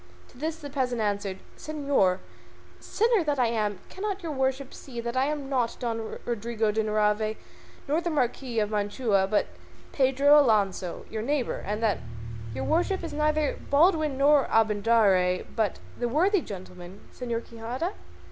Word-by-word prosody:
To - - -19
this 315 +2 -2
the 290 -4 -9
peasant 255 -4 -1
answered, 200 -2 -1 0.2
"Señor 280 -12 +1 0.6
sinner 450 -3 +2
that 295 -2 0
I 250 - +3
am! 215 -3 0
cannot 395 0 -4
your 325 - -3
worship 265 -1 -1
see 245 -4 -8
that 235 +1 -4
I 260 +1 +3
am 295 -2 -3
not 250 -4 0
Don 225 -2 -3
Rodrigo 230 -1 -1
de 220 +1 +1
Narvaez 215 0 +1 0.5
nor 305 +4 +1
the 345 - -2
Marquis 255 -4 -1
of 210 -1 +1
Mantua, 205 -1 +1
but 210 +1 +2 0.5
Pedro 275 +2 +5
Alonso 200 -8 +1
your 220 - -3
neighbour, 275 +2 -1
and 210 +3 -3
that 215 -3 +2 0.6
your 130 - -3
worship 355 - +1
is 335 - -5
neither 305 0 +1
Baldwin 310 -1 +3
nor 285 0 +5
Abindarraez, 205 -4 +3
but 215 -4 0 0.2
the 240 0 0
worthy 365 - +3
gentleman 180 -3 -9
Señor 235 -2 -3
Quixada?" 240 - -4
240 Hz, 155 wpm, -27 LUFS, 215-295 Hz, 0.6 s, Pedro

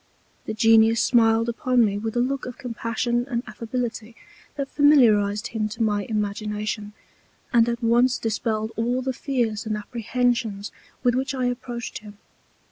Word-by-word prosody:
The - - -3
Genius 225 +1 +5
smiled 230 -2 +3
upon 240 0 +2
me 200 -1 -1
with 225 +1 -4
a 240 - +2
Look 270 +2 -2
of 250 - -8
Compassion 240 -1 -2
and 240 -2 -2
Affability 230 -1 -5 0.4
that 275 -1 -3
familiarized 220 -8 +4
him 215 -2 -2
to 220 +2 -2
my 205 -2 0
Imagination, 210 0 -3 0.6
and 235 0 +5
at 235 0 -3
once 240 +2 +3
dispelled 220 -1 -2
all 245 +3 -1
the 260 0 -1
Fears 235 -6 -2
and 215 -1 -1
Apprehensions 230 -1 -1 0.3
with 245 -1 +3
which 265 +2 -1
I 255 -1 -1
approached 245 -1 -4
him. 210 -1 -13
230 Hz, 150 wpm, -24 LUFS, 215-245 Hz, 0.6 s, Genius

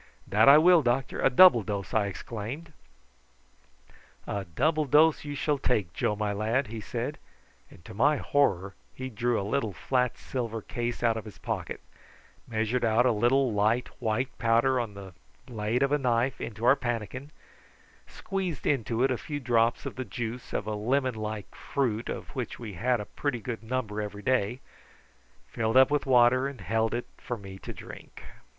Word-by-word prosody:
"That 110 +6 +5
I 140 - +10
will, 175 +1 +6
doctor 130 +1 -1
a - - +5
double 135 -2 +7
dose," 100 -4 -4
I 105 -2 +2
exclaimed. 120 - -6 1.5
"A 100 -1 -3
double 155 - +1
dose 150 +3 +4
you 145 -1 -5
shall 145 0 0
take, 100 -11 0
Joe, 105 - 0
my 105 -1 -1
lad," 110 +6 0
he 110 -1 -6
said; - - -4 0.5
and 85 - -17
to - - -10
my 140 +9 +3
horror 100 -12 +1 0.2
he 130 0 -6
drew 120 +2 0
a - - -2
little 110 -1 -1
flat 125 +7 0
silver 115 -4 -4
case 120 0 -4
out 115 -1 +2
of 110 - -6
his 105 - -11
pocket, - - -4 0.7
measured 115 +2 -1
out 115 +2 +3
a 125 - +4
little 120 +3 +2
light 110 +4 +1
white 120 +2 -1
powder 120 +3 +3
on 115 -4 -4
the 95 -2 -10 0.3
blade 115 +1 -1
of 140 - +1
a 145 - +2
knife 125 0 0
into 115 +1 -5
our 125 +3 +7
pannikin, 120 +2 -4 0.8
squeezed 190 - -4
into 120 -3 +1
it 135 - +3
a 125 - -1
few 145 -1 -5
drops 120 -3 +1
of - - -6
the 130 - -2
juice 120 -1 -6
of - - -2
a 110 - -3
lemon 130 +5 0
like 110 -3 -5
fruit 120 -6 -2
of - - -5
which 125 -4 -4
we 110 -4 -7
had 120 +6 0
a 105 - -5
pretty 140 0 -3
good 115 0 -5
number 110 -3 -3
every 105 0 -6
day, 125 -1 0 0.9
filled 115 +2 0
up 130 +2 +6
with 145 -1 0
water, 130 +1 +5
and 140 -5 -8
held 110 +5 0
it 120 - -3
for 120 - -5
me 95 -2 -10
to - - -7
drink. - - -11
120 Hz, 180 wpm, -28 LUFS, 110-130 Hz, 1.5 s, I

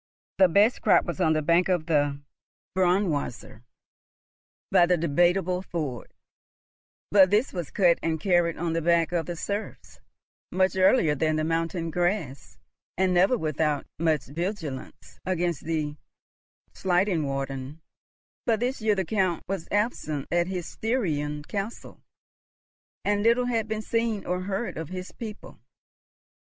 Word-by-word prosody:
The 190 - +8
best 205 +7 +3
crop - - +4
was 170 -4 -4
on 160 - +4
the 155 -1 0
bank 170 +4 +3
of 175 -4 +1
the 145 -3 +1 0.6
Braunwasser, 175 - 0 1.1
by 175 - +5
the 180 0 +3
Debateable 175 +3 +2
Ford, 150 -10 -5 1.0
but 195 -2 +7
this 210 +6 +1
was 175 -5 -4
cut 175 -4 +3
and 160 -1 -1
carried 175 -1 +2
on 165 -1 -2
the 165 - 0
backs 170 +1 +2
of 165 -3 -1
the 175 - -3
serfs, 200 +5 -5 0.5
much 185 +1 +2
earlier 190 -4 +4
than 155 +2 0
the 155 - 0
mountain 165 +1 -1
grass, 175 -6 -2 0.4
and 185 0 +2
never 190 +8 +4
without 155 -3 -1
much 160 -3 +1
vigilance 165 -2 -6
against 175 -3 -1
the 155 -2 -2 0.8
Schlangenwaldern; 145 -7 -1 0.7
but 225 -2 +2
this 250 +1 -2
year 215 -1 +2
the 190 -2 -1
Count 185 -4 0
was 190 -3 -4
absent 200 - -1
at 175 0 +2
his 180 -2 -4
Styrian 150 - -2
castle, 200 +6 -6 1.0
and 205 0 +1
little 235 +3 +3
had 230 -3 0
been 220 0 -3
seen 230 -2 -1
or 180 +1 -1
heard 195 +1 -3
of 160 -2 -6
his 185 0 -6
people. 220 -3 -9
175 Hz, 140 wpm, -26 LUFS, 155-195 Hz, 1.1 s, The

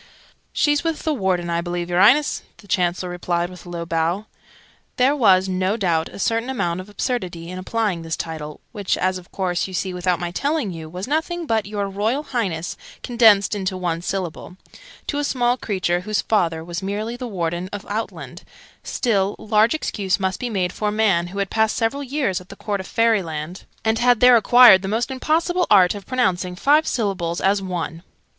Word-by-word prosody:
"She's 295 +1 +2
with 325 -2 -2
the 315 - +1
Warden, 185 -8 -1
I 170 0 0
believe, 175 0 -3
y'reince!" 215 +12 +4 0.2
the 205 - -17
Chancellor 180 -1 0
replied 175 0 -2
with 180 0 -12
a - - -8
low 170 -1 -5
bow. 170 +5 -1 0.7
There 265 +3 +3
was, 195 -8 +4
no 185 +3 0
doubt, 170 -6 0
a - - -11
certain 230 +5 0
amount 180 -9 -1
of 190 - -13
absurdity 185 -6 -3
in 185 - -6
applying 205 -2 -1
this 165 0 -4
title 155 -2 -6
(which, 205 -4 -1
as 185 0 0
of 180 - -18
course 180 -2 -1
you 190 - -7
see 185 +1 -2
without 180 -1 0
my 175 -1 -3
telling 285 - -1
you, 160 -2 -8
was 180 +5 -6
nothing 325 +4 -1
but 220 -7 0
'your 205 -1 -2
Royal 215 +9 -1
Highness' 190 - -3 0.3
condensed 225 -5 +4
into 190 -2 -2
one 170 -2 -2
syllable) 180 -1 -4 0.5
to 290 - -2
a - - -1
small 245 -3 +1
creature 185 -7 -1
whose 210 +3 -1
father 165 -7 +1
was 170 +2 -5
merely 210 +4 -3
the 250 0 -6
Warden 175 -3 -3
of 205 -1 -6
Outland: 220 +2 -5 0.4
still, 200 -5 0
large 215 +4 +2
excuse 200 -10 -1
must 190 -1 -1
be 250 - -3
made 185 -5 -1
for 210 - -2
a - - +1
man 200 -5 +2
who 190 +3 -9
had 200 -1 -2
passed 220 -1 +2
several 230 +5 0
years 260 -9 -1
at 180 - -17
the - - -9
Court 205 -2 -3
of 190 - -7
Fairyland, 180 -7 0 0.2
and 220 0 +2
had 245 -1 +4
there 250 0 +7
acquired 235 -3 +7
the 190 - -4
almost 225 +6 -1
impossible 335 +6 0
art 185 -4 +6
of 205 -2 -9
pronouncing 185 -8 0
five 295 +10 +3
syllables 190 -7 -1
as 195 +1 +2
one. 175 -3 -4
195 Hz, 195 wpm, -21 LUFS, 175-230 Hz, 0.7 s, there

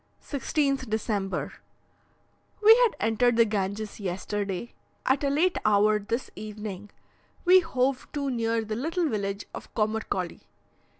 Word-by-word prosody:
16th 275 -2 -1
December. 210 -3 -2 1.1
We 440 +2 +10
had - - +4
entered 225 +2 +2
the 230 - +6
Ganges 210 0 -3
yesterday. 195 +2 -3 0.3
At 265 +2 +2
a 280 - +2
late 335 +6 +2
hour 210 0 +4
this 230 +5 -3
evening 210 -2 -7 0.6
we 365 +1 +8
hove 265 -6 -1
to 280 -2 -1
near 230 -2 0
the 215 0 -3
little 325 +7 0
village 200 -4 -2
of - - -9
Commercolly. 215 -5 -1
220 Hz, 125 wpm, -27 LUFS, 205-275 Hz, 1.1 s, We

